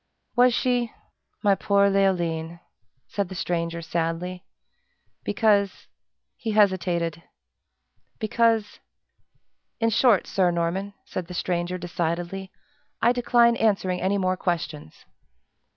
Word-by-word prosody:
"Was 245 Hz, +1 st, +6 dB
she? 245 Hz, -2 st, +1 dB, 0.5 s
My 205 Hz, -1 st, +5 dB
poor 200 Hz, 0 st, +3 dB
Leoline!" 170 Hz, -4 st, 0 dB, 0.5 s
said 200 Hz, -3 st, -2 dB
the 190 Hz, -, -7 dB
stranger, 170 Hz, -1 st, -2 dB
sadly. 170 Hz, +2 st, -3 dB, 0.8 s
"Because 205 Hz, -3 st, +1 dB, 0.3 s
" -, -, -57 dB
he 220 Hz, -2 st, -1 dB
hesitated, 175 Hz, -5 st, +1 dB, 1.0 s
"because 225 Hz, -1 st, +1 dB, 1.0 s
in 230 Hz, 0 st, +2 dB
short, 225 Hz, -2 st, +4 dB
Sir 185 Hz, -2 st, +2 dB
Norman," 175 Hz, +4 st, -2 dB
said 180 Hz, -2 st, -5 dB
the 180 Hz, -, -8 dB
stranger, 175 Hz, 0 st, -1 dB
decidedly, 175 Hz, +2 st, -3 dB, 0.5 s
"I 235 Hz, -, +4 dB
decline 240 Hz, -1 st, +4 dB
answering 190 Hz, -4 st, +1 dB
any 190 Hz, +2 st, +1 dB
more 185 Hz, -1 st, +1 dB
questions!" 165 Hz, -, -4 dB
185 Hz, 105 wpm, -25 LUFS, 170-210 Hz, 1.0 s, Was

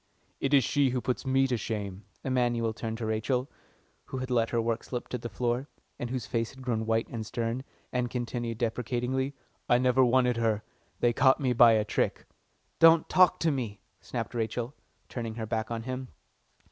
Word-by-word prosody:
"It's 135 Hz, -3 st, +3 dB
she 145 Hz, -2 st, +3 dB
who 125 Hz, 0 st, 0 dB
puts 125 Hz, +2 st, -2 dB
me 135 Hz, 0 st, +4 dB
to 125 Hz, -2 st, 0 dB
shame." 100 Hz, -3 st, -4 dB, 0.2 s
Emanuel 120 Hz, -3 st, +1 dB
turned 115 Hz, 0 st, -4 dB
to 115 Hz, -, -4 dB
Rachel, 125 Hz, +4 st, -1 dB, 0.5 s
who 130 Hz, -, -6 dB
had 130 Hz, 0 st, -4 dB
let 115 Hz, -2 st, +2 dB
her 120 Hz, -, 0 dB
work 115 Hz, 0 st, -1 dB
slip 125 Hz, -2 st, -5 dB
to 125 Hz, -, -3 dB
the 120 Hz, -, -5 dB
floor, 120 Hz, +6 st, -1 dB, 0.3 s
and 120 Hz, -, -3 dB
whose 125 Hz, -3 st, -3 dB
face 115 Hz, -1 st, -1 dB
had 130 Hz, -1 st, -12 dB
grown 110 Hz, -3 st, -1 dB
white 115 Hz, 0 st, +1 dB
and 115 Hz, -2 st, -4 dB
stern, 115 Hz, +3 st, -2 dB, 0.3 s
and 125 Hz, -1 st, 0 dB
continued 120 Hz, -2 st, -3 dB
deprecatingly, 125 Hz, +3 st, -1 dB, 0.3 s
"I 120 Hz, -, +6 dB
never 125 Hz, +1 st, +4 dB
wanted 125 Hz, -1 st, +3 dB
her. 110 Hz, -2 st, +1 dB, 0.4 s
They 120 Hz, -1 st, +4 dB
caught 130 Hz, +2 st, +4 dB
me 130 Hz, -3 st, +1 dB
by 120 Hz, -1 st, +7 dB
a 110 Hz, -1 st, +2 dB
trick." -, -, -1 dB, 0.5 s
"Don't 165 Hz, -1 st, +7 dB
talk 185 Hz, -1 st, +5 dB
to 165 Hz, -, +3 dB
me," 115 Hz, -7 st, -3 dB, 0.2 s
snapped -, -, -5 dB
Rachel, 120 Hz, +2 st, -2 dB, 0.3 s
turning 115 Hz, -3 st, -5 dB
her 115 Hz, -1 st, -3 dB
back 110 Hz, 0 st, -2 dB
on 115 Hz, -1 st, -3 dB
him. 130 Hz, +1 st, -4 dB
120 Hz, 185 wpm, -29 LUFS, 115-130 Hz, 0.5 s, by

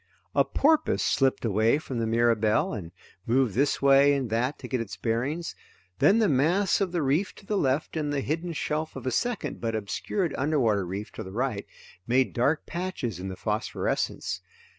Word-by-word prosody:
A -, -, +4 dB
porpoise 310 Hz, +2 st, +2 dB
slipped 135 Hz, -3 st, +1 dB
away 110 Hz, +4 st, +3 dB
from 135 Hz, -5 st, -5 dB
the 115 Hz, -, 0 dB
Mirabelle 115 Hz, -, +2 dB
and 85 Hz, -6 st, -6 dB, 0.4 s
moved 125 Hz, -2 st, +2 dB
this 140 Hz, +5 st, +1 dB
way 140 Hz, +1 st, +6 dB
and 130 Hz, -5 st, -2 dB
that 125 Hz, +5 st, 0 dB
to -, -, -8 dB
get 130 Hz, -3 st, -1 dB
its 105 Hz, -3 st, -6 dB
bearings. 130 Hz, -, -2 dB, 0.5 s
Then 200 Hz, -, +5 dB
the 220 Hz, -2 st, +3 dB
mass 175 Hz, +9 st, +2 dB
of 190 Hz, -3 st, 0 dB
the 175 Hz, -3 st, 0 dB
reef 150 Hz, +9 st, 0 dB
to 200 Hz, -, -15 dB
the 210 Hz, -, -1 dB
left 145 Hz, -3 st, 0 dB
and 150 Hz, -2 st, -1 dB
the 140 Hz, -1 st, 0 dB
hidden 165 Hz, +5 st, -2 dB
shelf 155 Hz, 0 st, -2 dB
of -, -, -7 dB
a 130 Hz, -, 0 dB
second 240 Hz, -, -2 dB
but 115 Hz, -1 st, -1 dB
obscured 110 Hz, -, -2 dB
underwater 120 Hz, -, +1 dB
reef 100 Hz, +4 st, -5 dB
to -, -, -7 dB
the 95 Hz, -, -9 dB
right 115 Hz, -1 st, -2 dB, 0.4 s
made 130 Hz, +2 st, +2 dB
dark 140 Hz, +6 st, +1 dB
patches 170 Hz, -, -4 dB
in 95 Hz, -, -5 dB
the 95 Hz, -, -5 dB
phosphorescence. 105 Hz, +3 st, -2 dB
135 Hz, 185 wpm, -27 LUFS, 115-160 Hz, 0.5 s, way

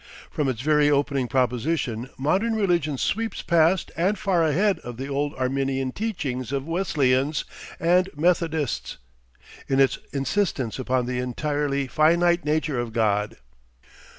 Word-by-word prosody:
From 145 Hz, -3 st, 0 dB
its 120 Hz, -3 st, -3 dB
very 150 Hz, 0 st, +3 dB
opening 140 Hz, -2 st, +1 dB
proposition 125 Hz, -1 st, -1 dB
modern 195 Hz, +12 st, +1 dB
religion 170 Hz, -9 st, +1 dB
sweeps 225 Hz, -, -2 dB
past 170 Hz, +2 st, +2 dB
and 190 Hz, +5 st, +1 dB
far 185 Hz, -5 st, +1 dB
ahead 190 Hz, +6 st, +2 dB
of 120 Hz, -1 st, -8 dB
the 135 Hz, -, -4 dB
old 145 Hz, +1 st, -2 dB
Arminian 135 Hz, 0 st, -1 dB
teachings 140 Hz, -, -3 dB
of 140 Hz, -1 st, -2 dB
Wesleyans 150 Hz, -5 st, +1 dB, 0.3 s
and 180 Hz, +3 st, +3 dB
Methodists, 160 Hz, -3 st, 0 dB, 0.7 s
in 135 Hz, -, +1 dB
its 135 Hz, -1 st, +3 dB
insistence 135 Hz, -, -1 dB
upon 130 Hz, -1 st, 0 dB
the 125 Hz, 0 st, -2 dB
entirely 140 Hz, +2 st, -1 dB
finite 170 Hz, +5 st, +3 dB
nature 150 Hz, -3 st, 0 dB
of 120 Hz, -2 st, -4 dB
God. 105 Hz, -2 st, 0 dB
145 Hz, 130 wpm, -24 LUFS, 130-170 Hz, 0.7 s, very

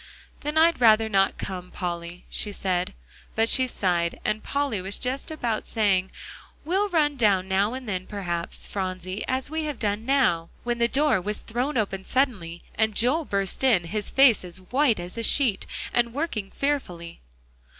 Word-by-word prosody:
"Then 300 Hz, +2 st, -3 dB
I'd 325 Hz, -3 st, +4 dB
rather 220 Hz, -1 st, +6 dB
not 195 Hz, -2 st, +2 dB
come, 180 Hz, -1 st, -5 dB
Polly," 175 Hz, -1 st, -5 dB
she 210 Hz, -, -2 dB
said. 185 Hz, -3 st, -1 dB, 0.4 s
But 225 Hz, +1 st, +3 dB
she 260 Hz, +2 st, +2 dB
sighed 175 Hz, -7 st, 0 dB
and 215 Hz, 0 st, 0 dB
Polly 280 Hz, -8 st, -1 dB
was 190 Hz, +2 st, -4 dB
just 265 Hz, +4 st, -3 dB
about 240 Hz, -9 st, -2 dB
saying, 195 Hz, -4 st, +1 dB, 0.6 s
"We'll 390 Hz, +5 st, +1 dB
run 300 Hz, -5 st, +2 dB
down 200 Hz, -5 st, +3 dB
now 200 Hz, +5 st, +1 dB
and 260 Hz, -2 st, -7 dB
then 185 Hz, -3 st, -3 dB
perhaps, 175 Hz, -5 st, -4 dB
Phronsie, 185 Hz, 0 st, -4 dB
as 260 Hz, +2 st, -2 dB
we 315 Hz, 0 st, -2 dB
have 295 Hz, -4 st, -3 dB
done 210 Hz, 0 st, -1 dB
now," 235 Hz, -11 st, +2 dB
when 240 Hz, 0 st, -1 dB
the 235 Hz, -, +4 dB
door 280 Hz, -5 st, +2 dB
was 210 Hz, +3 st, -3 dB
thrown 250 Hz, +5 st, -2 dB
open 195 Hz, -3 st, -1 dB
suddenly, 200 Hz, -12 st, -1 dB
and 220 Hz, -1 st, +1 dB
Joel 280 Hz, +9 st, +2 dB
burst 195 Hz, +2 st, -1 dB
in, 230 Hz, -10 st, +4 dB
his 205 Hz, +5 st, -3 dB
face 265 Hz, -7 st, +5 dB
as 180 Hz, -1 st, -8 dB
white 245 Hz, +4 st, +2 dB
as 175 Hz, +6 st, -6 dB
a -, -, -2 dB
sheet, 230 Hz, -4 st, +2 dB, 0.3 s
and 235 Hz, 0 st, +1 dB
working 255 Hz, -10 st, -2 dB
fearfully. 180 Hz, -14 st, -3 dB
215 Hz, 170 wpm, -25 LUFS, 185-265 Hz, 0.6 s, rather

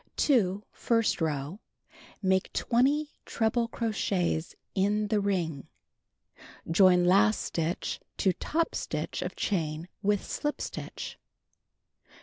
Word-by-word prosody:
2. 205 Hz, -8 st, +2 dB
First 230 Hz, -5 st, +1 dB
row: 150 Hz, +3 st, -2 dB, 0.6 s
Make 190 Hz, 0 st, +2 dB
20 275 Hz, +6 st, +2 dB, 0.2 s
treble 230 Hz, +1 st, 0 dB
crochets 195 Hz, -8 st, -1 dB, 0.2 s
in 205 Hz, +2 st, +1 dB
the 215 Hz, -1 st, +2 dB
ring 175 Hz, -8 st, -1 dB, 0.7 s
(see -, -, -23 dB, 0.2 s
page 165 Hz, -, -3 dB
228). 185 Hz, +4 st, +5 dB
stitch 165 Hz, +2 st, -2 dB, 0.2 s
to 190 Hz, -, +2 dB
top 330 Hz, -, -1 dB
stitch -, -, -3 dB
of -, -, -4 dB
chain 160 Hz, -4 st, -1 dB
with 205 Hz, -1 st, +1 dB
slip 295 Hz, 0 st, -2 dB
stitch. -, -, -6 dB
195 Hz, 110 wpm, -29 LUFS, 175-225 Hz, 0.7 s, 228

